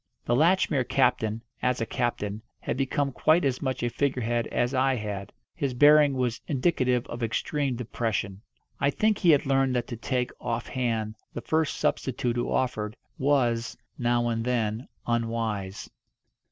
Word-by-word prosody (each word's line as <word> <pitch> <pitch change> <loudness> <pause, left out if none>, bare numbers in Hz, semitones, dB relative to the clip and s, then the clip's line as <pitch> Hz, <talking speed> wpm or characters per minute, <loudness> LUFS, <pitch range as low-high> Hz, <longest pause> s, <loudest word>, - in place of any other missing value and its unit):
The 120 - +2
Latchmere 155 -2 +3
captain, 120 -4 +1 0.2
as 125 0 +1
a 115 - 0
captain, 110 -3 -2 0.2
had - - -2
become 135 +1 0
quite 155 +5 +3
as 130 -2 0
much 130 -3 -2
a 120 - +1
figurehead 120 -4 0
as 120 +2 0
I 130 0 +2
had. 105 -3 -5 0.2
His 135 -3 -2
bearing 145 +1 +6
was 125 -2 -1
indicative 130 -4 +1
of 120 - -7
extreme 135 +4 -1
depression. 110 -4 -3 0.4
I 140 - +3
think 215 +7 +1
he 175 - +3
had 145 -3 +5
learned 135 -1 +2
that 120 -1 0
to 120 - -4
take, 125 +2 -1
off 120 -1 -2
hand, 115 -4 -2 0.2
the 120 - -3
first 160 +2 0
substitute 120 -2 0
who 120 - -1
offered, 110 -4 -1 0.2
was, 120 -5 +1 0.2
now 120 -1 +2
and 115 -1 -1
then, 115 -1 -1 0.2
unwise. 115 -4 -2
125 Hz, 155 wpm, -27 LUFS, 115-135 Hz, 0.4 s, bearing